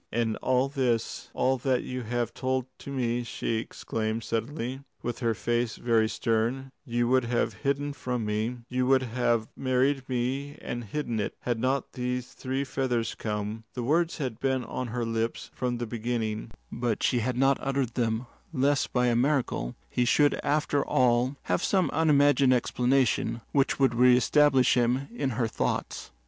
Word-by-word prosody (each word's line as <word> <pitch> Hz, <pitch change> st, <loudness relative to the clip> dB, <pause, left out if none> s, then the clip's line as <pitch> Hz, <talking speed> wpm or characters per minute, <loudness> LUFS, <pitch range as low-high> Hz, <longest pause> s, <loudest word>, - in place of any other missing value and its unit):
"And 115 Hz, -1 st, 0 dB
all 130 Hz, +1 st, +2 dB
this 125 Hz, -5 st, -1 dB
all 130 Hz, 0 st, +2 dB
that 130 Hz, -1 st, +1 dB
you 125 Hz, 0 st, -4 dB
have 120 Hz, 0 st, -2 dB
told 130 Hz, -1 st, -1 dB
to -, -, -9 dB
me," 120 Hz, -2 st, 0 dB
she 115 Hz, -1 st, -2 dB
exclaimed 110 Hz, 0 st, -3 dB
suddenly, 120 Hz, +3 st, -3 dB, 0.2 s
with 120 Hz, -1 st, -3 dB
her 115 Hz, -3 st, +1 dB
face 120 Hz, 0 st, -1 dB
very 115 Hz, -2 st, +2 dB
stern, 120 Hz, +4 st, -1 dB, 0.2 s
"you 120 Hz, 0 st, +1 dB
would 130 Hz, 0 st, +3 dB
have 120 Hz, 0 st, 0 dB
hidden 140 Hz, +1 st, 0 dB
from 125 Hz, -4 st, -3 dB
me? 110 Hz, +4 st, -1 dB
You 125 Hz, 0 st, 0 dB
would 130 Hz, 0 st, +4 dB
have 120 Hz, -2 st, 0 dB
married 135 Hz, +1 st, +1 dB
me 130 Hz, +3 st, -2 dB
and 120 Hz, -1 st, -5 dB
hidden 120 Hz, 0 st, -3 dB
it, 105 Hz, -, -2 dB
had 120 Hz, -2 st, -1 dB
not 130 Hz, +2 st, 0 dB
these 125 Hz, 0 st, -3 dB
three 130 Hz, +1 st, -2 dB
feathers 125 Hz, -4 st, -1 dB
come?" 105 Hz, +1 st, -4 dB
The 125 Hz, -, -3 dB
words 165 Hz, +6 st, +1 dB
had 130 Hz, -8 st, -3 dB
been 130 Hz, -1 st, 0 dB
on 125 Hz, +1 st, -4 dB
her 120 Hz, +1 st, -2 dB
lips 115 Hz, 0 st, -2 dB
from 125 Hz, -1 st, -2 dB
the 120 Hz, -, -3 dB
beginning, 115 Hz, -1 st, -3 dB, 0.2 s
but 120 Hz, -2 st, -1 dB
she 125 Hz, -, +3 dB
had 125 Hz, +2 st, -1 dB
not 135 Hz, +1 st, +3 dB
uttered 135 Hz, -3 st, -1 dB
them 115 Hz, 0 st, 0 dB, 0.3 s
lest 140 Hz, -1 st, +1 dB
by 125 Hz, -1 st, +2 dB
a 120 Hz, -1 st, +3 dB
miracle 125 Hz, -, 0 dB
he 125 Hz, -, 0 dB
should 145 Hz, +4 st, +4 dB
after 145 Hz, -1 st, +1 dB
all 125 Hz, +2 st, +2 dB
have -, -, 0 dB
some 190 Hz, -3 st, +2 dB
unimagined 145 Hz, -4 st, +4 dB
explanation 125 Hz, -1 st, +1 dB
which 140 Hz, -1 st, +2 dB
would 135 Hz, -3 st, +4 dB
reestablish 125 Hz, +3 st, +5 dB
him 125 Hz, +2 st, +1 dB
in 140 Hz, -, -1 dB
her 120 Hz, -3 st, +1 dB
thoughts. 110 Hz, -, -2 dB
125 Hz, 165 wpm, -28 LUFS, 115-135 Hz, 0.3 s, reestablish